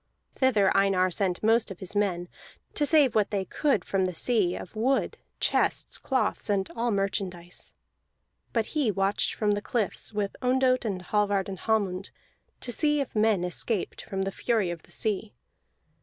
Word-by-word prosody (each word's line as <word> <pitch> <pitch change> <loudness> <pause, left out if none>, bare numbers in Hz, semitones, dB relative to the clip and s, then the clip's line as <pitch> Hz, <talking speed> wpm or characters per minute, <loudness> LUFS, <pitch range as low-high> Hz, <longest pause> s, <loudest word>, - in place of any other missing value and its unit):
Thither 220 -7 +3
Einar 195 -2 +3
sent 185 -1 -1
most 225 +1 +3
of 195 - -8
his 190 +2 -7
men, 185 -4 0 0.5
to 295 - +1
save 290 -7 +5
what 210 -2 +2
they 195 -3 -1
could 275 - 0
from 190 -1 +1
the 185 -2 -3
sea, 200 -2 +2
of 185 - -9
wood, 255 +5 0 0.2
chests, - - +1
cloths, 260 -4 -1
and 195 -2 +1
all 240 +1 0
merchandise. 190 -4 -3 0.8
But 230 -2 +1
he 295 -7 +2
watched 195 0 0
from 210 -1 +1
the 205 0 0
cliffs, 220 -3 -1
with 205 -2 -2
Ondott 255 0 +2
and 190 -4 -2
Hallvard 205 0 +1
and 190 -2 -6
Hallmund, 200 -4 0 0.5
to 245 - -3
see 295 +3 +2
if 275 - -3
men 215 -4 +3
escaped 180 +3 -1
from 195 0 -3
the 195 - -2
fury 215 -4 0
of 170 -2 -6
the - - -19
sea. 215 0 -2
205 Hz, 170 wpm, -27 LUFS, 190-230 Hz, 0.8 s, save